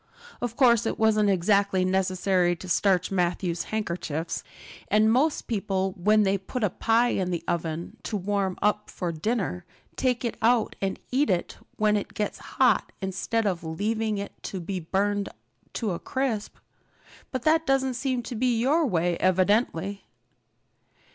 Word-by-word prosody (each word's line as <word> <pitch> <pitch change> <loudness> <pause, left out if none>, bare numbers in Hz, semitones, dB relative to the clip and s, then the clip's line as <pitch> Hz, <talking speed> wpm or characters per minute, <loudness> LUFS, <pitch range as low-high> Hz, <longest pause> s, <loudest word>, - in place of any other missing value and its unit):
Of 240 -1 -3
course 235 -4 +4
it - - -2
wasn't 215 -2 +3
exactly 195 0 +2
necessary 185 -1 +1
to 185 - -10
starch 185 +1 +2
Matthew's 175 -1 0
handkerchiefs! 170 -6 -3 0.4
And 215 +1 +4
most 290 +5 +2
people 195 -3 -1
when 210 +4 +3
they 195 0 +1
put 225 +6 -4
a 205 - +2
pie 230 +4 +2
in 185 -5 -1
the 175 -2 -2
oven 165 0 -3
to 215 - -2
warm 195 -1 -1
up 210 0 +1
for 175 -3 -3
dinner 180 +1 -2 0.3
take 250 -1 0
it 235 - -2
out 230 0 +3
and 195 -1 -1
eat 280 +4 +2
it 180 -2 -1 0.2
when 210 0 +2
it 205 - -3
gets 210 - -2 0.2
hot - - +3
instead 195 +4 -1
of 180 -4 -1
leaving 210 +6 -1
it 200 0 -5
to 190 - -5
be 185 +2 -4
burned 200 +4 0 0.4
to 220 -4 -2
a 170 - -3
crisp. 255 -6 -2 0.8
But 255 -2 -3
that 320 0 +3
doesn't 265 -1 +2
seem 255 -1 -1
to 245 - -6
be 240 0 +1
your 290 +7 +2
way 175 -4 +1
evidently." 195 0 +1
205 Hz, 155 wpm, -26 LUFS, 185-230 Hz, 0.8 s, course